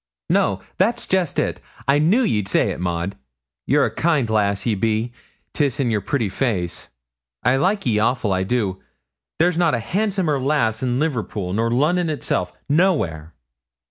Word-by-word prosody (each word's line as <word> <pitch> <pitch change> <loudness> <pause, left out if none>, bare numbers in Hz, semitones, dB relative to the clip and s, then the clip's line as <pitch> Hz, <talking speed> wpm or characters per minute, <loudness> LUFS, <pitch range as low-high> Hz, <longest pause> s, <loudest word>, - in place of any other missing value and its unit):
'No, 95 -1 +2 0.2
that's 230 +6 +1
jest 185 -5 0
it. - - -1 0.3
I 140 +1 +4
knew 190 +12 +3
ye'd 105 - 0
say - - +2
it, - - -6
Maud. 90 +2 -2 0.5
Ye're - - +4
a - - -3
kind 155 -7 +1
lass 100 -2 +1
ye 115 - +2
be 110 +3 0 0.4
'tis 145 -2 0
in 125 -4 +1
yer 105 -2 0
pretty 120 +1 -1
face. 95 -5 -2 0.5
I 125 +2 +3
like 195 +7 +1
ye 110 -4 +2
awful, 110 -2 +1
I 95 - 0
do 95 -2 -1 0.6
there's 175 +1 +2
not 170 -6 +3
a - - -1
handsomer 185 - 0
lass 130 -5 +1
in 125 -1 0
Liverpool 110 - -2
nor 115 +3 +1
Lunnon 160 +8 +2
itself 90 - -2 0.2
no 175 +6 +4
where.' 80 - -5
125 Hz, 170 wpm, -21 LUFS, 100-155 Hz, 0.6 s, I